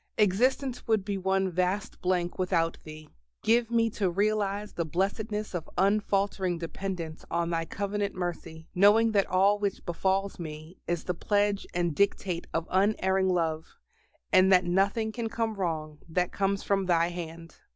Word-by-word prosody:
Existence 245 +6 +1
would 220 -4 +2
be 200 -1 -2
one 190 0 0
vast 185 +4 -1
blank 180 -2 0
without 170 -3 +1
Thee. 155 0 -10 0.4
Give 230 +1 +3
me 230 -1 +2
to 200 -3 0
realize 205 +2 0
the 170 - -1
blessedness 210 +6 -2
of 170 -3 -4
unfaltering 195 -2 +1
dependence 165 -1 -5
on 170 0 -1
Thy 165 -1 -1
covenant 200 +2 -3
mercy, 170 -3 -5
knowing 205 +4 +5
that 200 -2 +2
all 195 +3 +3
which 200 -2 -2
befalls 190 +3 -1
me 155 +1 -8
is 175 -1 -1
the 180 - -2
pledge 205 +2 0
and 175 -2 +1
dictate 185 -1 0
of 165 0 -2
unerring 190 -1 +2
love, 160 -3 -1 0.6
and 185 +1 +6
that 180 -1 +5
nothing 200 +5 +1
can 230 0 -3
come 225 -1 -1
wrong 160 -6 -3
that 180 +2 0
comes 195 0 0
from 195 -2 0
Thy 170 -1 +3
hand. 165 -1 -8
190 Hz, 155 wpm, -28 LUFS, 170-205 Hz, 0.6 s, and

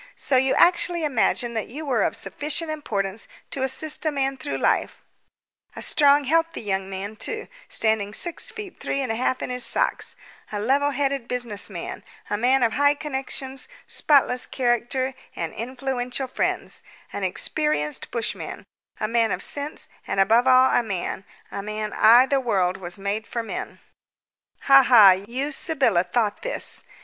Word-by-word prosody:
So 275 - -1
you 260 +1 +3
actually 345 -1 +3
imagined 240 -3 0
that 220 - -2
you 300 +6 -7
were 250 -6 +1
of - - +1
sufficient 300 - -2
importance 210 -9 -3 0.2
to 270 - -2
assist 280 +4 -1
a 310 - +1
man 270 -1 -1
through 265 +2 -4
life - - 0 0.7
a - - -6
strong, 285 -1 +4
healthy 330 +4 0
young 195 -2 -2
man 195 +2 -5
too, 440 - -4 0.2
standing 220 -2 +1
six 340 +10 -3
feet 425 -6 -8
three 275 - -2
and 255 -4 -2
a - - -1
half 255 +2 -1
in - - -4
his 250 0 0
socks, - - +1 0.4
a 210 - -3
level 275 +7 +2
headed 275 -3 -1
business 240 -5 -3
man, 175 -4 -7 0.3
a - - +2
man 250 +4 +2
of 230 - +2
high 285 +1 +3
connections, 270 -2 -3 0.2
spotless 265 -4 +3
character, 255 +1 0 0.2
and 165 - -4
influential 255 +2 -3
friends, - - -1 0.3
an - - -4
experienced 300 - -1
bushman, 235 -2 -4 0.4
a 215 - -1
man 230 -1 +1
of - - -1
sense, 290 +1 -2 0.2
and, - - -1
above 225 +6 +4
all, 255 0 +6
a - - +3
man 195 -3 -4 0.3
a 200 - -4
man! 215 +1 -4 0.4
The 275 - +3
world 190 -7 0
was 175 -1 -6
made 200 +3 -3
for 235 -1 -3
men. 225 - -6 0.8
"Ha 275 0 +7
ha! 230 -7 +8
You, 235 +10 -2
Sybylla, 270 - +2
thought 210 +2 -1
this! - - -1
250 Hz, 160 wpm, -24 LUFS, 215-280 Hz, 0.8 s, ha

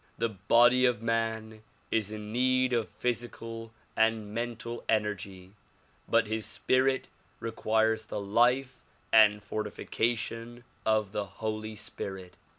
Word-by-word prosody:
The 115 +1 0
body 120 +5 +4
of 125 -4 +2
man 110 -1 -1 0.3
is 105 -2 0
in 105 0 -6
need 130 +1 +2
of 115 -3 0
physical 115 -1 -4 0.2
and 110 -2 +1
mental 120 0 -4
energy 100 -4 -1 0.6
but 115 0 +4
his 110 +1 -2
spirit 130 +4 +1 0.3
requires 110 0 +1
the 105 - -4
life 120 +6 +2 0.3
and 105 -2 +6
fortification 115 +3 -3 0.2
of 110 -2 +2
the 105 -1 -2
Holy 110 +1 -4
Spirit. 95 -3 -6
110 Hz, 115 wpm, -30 LUFS, 105-120 Hz, 0.6 s, and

